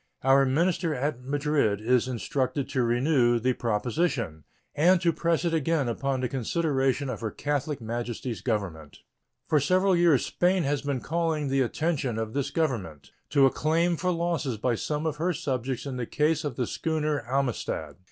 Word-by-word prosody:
Our 135 +1 +5
minister 165 +3 +1
at 135 0 -2
Madrid 140 -5 0
is 125 +3 +2
instructed 130 +2 -2
to 130 - 0
renew 120 0 +3
the 125 +2 +1
proposition 115 - -1 0.3
and 175 +5 +4
to 170 -1 +2
press 170 +1 0
it 170 - +1
again 160 -3 +1
upon 130 +2 -1
the 125 - 0
consideration 135 +1 0
of 125 -5 -5
Her 110 - -2
Catholic 145 +3 -2
Majesty's 120 -1 -4
Government. 95 - -3 0.5
For 150 - +3
several 185 +6 +3
years 170 -6 +4
Spain 180 0 +1
has 140 0 0
been 140 -3 -2
calling 160 -3 -1
the 135 0 +2
attention 135 -2 -1
of 110 -1 -3
this 140 -1 -1
Government 110 - -2 0.2
to 140 -2 +5
a 135 - +4
claim 165 +3 +1
for 180 +3 -1
losses 170 -8 -1
by 120 +3 0
some 150 +7 -2
of 155 -2 -1
her 175 +3 0
subjects 130 -3 -3
in 135 -2 -4
the 120 -2 -3
case 155 +1 +1
of 145 -5 -3
the 125 - -1
schooner 155 -3 -1
Amistad. 120 - -2
140 Hz, 170 wpm, -27 LUFS, 120-160 Hz, 0.5 s, Our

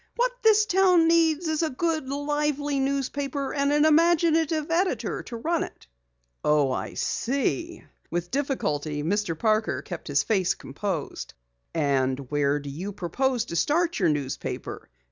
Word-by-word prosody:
"What - - +2
this 430 -2 +5
town 365 -4 +4
needs 330 0 +3
is 315 0 0
a 320 - +1
good, 315 0 -1
live 295 +1 0
newspaper, 280 -1 -2
and 280 0 +1
an 295 +1 +4
imaginative 320 -1 +3
editor 360 +3 0
to 235 - -8
run 330 +7 0
it." - - -10 0.6
"Oh, 150 -3 +3
I - - -4
see." 280 +7 -2 0.3
With 175 +1 -3
difficulty 155 - -1
Mr. 180 -1 -1
Parker 215 +2 +1
kept - - -7
his - - +2
face 190 -5 +1
composed. 155 - -5 0.4
"And 135 -3 0
where 145 -1 +2
do 140 -1 -7
you 180 +8 -5
propose 235 +7 -1
to 170 - -6
start 325 - +1
your 180 -4 +3
newspaper? 145 - -4
275 Hz, 145 wpm, -26 LUFS, -, 0.6 s, this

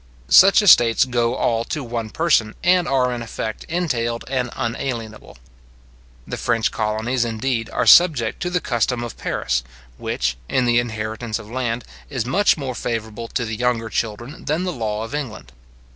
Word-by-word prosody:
Such 195 - +7
estates 120 - +6
go 120 -1 0
all 115 -1 0
to 155 -4 -4
one 115 -2 -4
person, 125 -8 +1
and 180 0 +3
are 130 -2 +1
in 120 - -4
effect 110 -1 -5
entailed 120 -9 -2
and 125 -2 -1
unalienable. 115 - -4 0.9
The - - -4
French 115 -1 0
colonies, 110 +3 -1
indeed, 115 0 -2
are - - -1
subject 150 -11 +5
to 180 - -1
the 180 -1 -1
custom 120 -1 0
of 120 - -6
Paris, - - -1 0.4
which, - - -2
in 130 - +1
the 120 0 +4
inheritance 110 -1 -3
of 105 - -11
land, 120 -2 -2 0.3
is 130 -5 -2
much 190 +11 +3
more 135 -3 -4
favourable 115 -1 -4
to 120 - -2
the 110 -1 -4
younger 115 -1 0
children 115 +5 -4
than 155 +4 0
the 180 -1 -2
law 110 -4 -3
of 115 - -8
England. 110 - -5
120 Hz, 165 wpm, -21 LUFS, 110-130 Hz, 0.9 s, Such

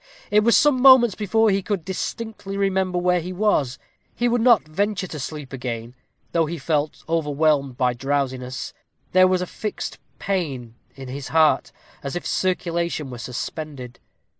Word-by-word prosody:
It 210 - +6
was 235 +1 +5
some 280 -4 +4
moments 260 -5 +8
before 215 +2 +2
he 195 0 +1
could 195 -4 -3
distinctly 200 +1 -5
remember 190 -2 0
where 180 0 +2
he 180 +3 -6
was. 180 -10 +1 0.4
He 245 - +1
would 240 0 +1
not 230 -8 +5
venture 200 +4 -1
to 160 -4 -7
sleep 145 -1 -6
again, 120 -2 -5 0.4
though 165 -2 +2
he 170 +2 -4
felt 150 0 -1
overwhelmed 150 -4 +1
by 125 -2 +2
drowsiness 130 -1 -3 0.4
there 185 0 +6
was 185 -1 +1
a - - -2
fixed 210 +3 -5 0.2
pain 140 - -3 0.2
at 135 -1 -8
his 135 +1 -6
heart, 160 -1 +3 0.3
as 140 +2 -5
if 175 - -4
circulation 170 -5 -1
were 120 - -7
suspended. 125 0 -6
165 Hz, 160 wpm, -23 LUFS, 140-195 Hz, 0.4 s, moments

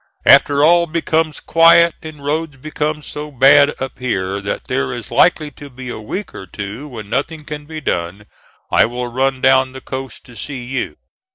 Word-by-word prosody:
After 145 0 +6
all 170 +2 +5
becomes 160 -1 -1
quiet, 165 0 +5
and 150 -3 -10
roads 150 -1 -2
become 150 +2 -3
so 150 +1 -7
bad 140 +2 +5
up 135 0 -6
here 100 -6 -2
that 100 - -4
there 65 -1 -2
is - - -6
likely 150 -1 +3
to 145 +1 -12
be 130 -1 -9
a 120 - -6
week 180 - -6
or 95 - -9
two 105 +8 -7
when 115 -7 -8
nothing 145 +7 -3
can 150 -1 -7
be 155 0 -7
done, 90 - -3 0.5
I - - +4
will 125 +1 -4
run 130 +2 0
down 130 0 +4
the 130 - -8
coast 130 -2 -7
to 125 - -14
see 130 +3 -6
you. 130 +2 -4
135 Hz, 185 wpm, -18 LUFS, 125-150 Hz, 0.5 s, After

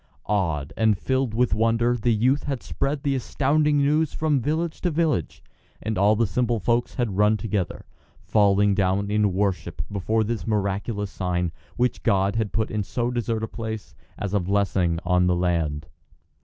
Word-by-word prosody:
Awed 80 -9 -1
and 110 -2 +3
filled 130 -2 -1
with 125 -2 +2
wonder 115 +3 +2
the 120 0 +1
youth 125 +6 +2
had 135 -3 -3
spread 140 0 -2
the 140 - +1
astounding 145 +3 +1
news 150 +2 +2
from 150 -4 +1
village 160 +4 -2
to 180 - +1
village, 155 - -1 0.4
and 110 0 -3
all 100 +3 +4
the 115 +2 +2
simple 120 +2 0
folk 120 +4 +1
had 115 -7 -2
run 105 +1 +4
together, 105 -4 -3 0.4
falling 100 -1 +3
down 100 +1 0
in 105 -1 +2
worship 90 -5 -1
before 110 +3 0
this 115 +1 -3
miraculous 105 0 -1
sign, 90 -2 -1 0.3
which 125 0 0
God 100 -1 +2
had 110 -3 -1
put 110 -1 -1
in 110 - -1
so 120 +5 -2
desert 115 -2 -2
a - - -1
place, 110 -2 -6 0.2
as 100 -1 -4
a 105 - +3
blessing 95 -2 +1
on 90 0 +3
the 90 - +3
land. 85 -4 -1
110 Hz, 170 wpm, -24 LUFS, 95-120 Hz, 0.4 s, all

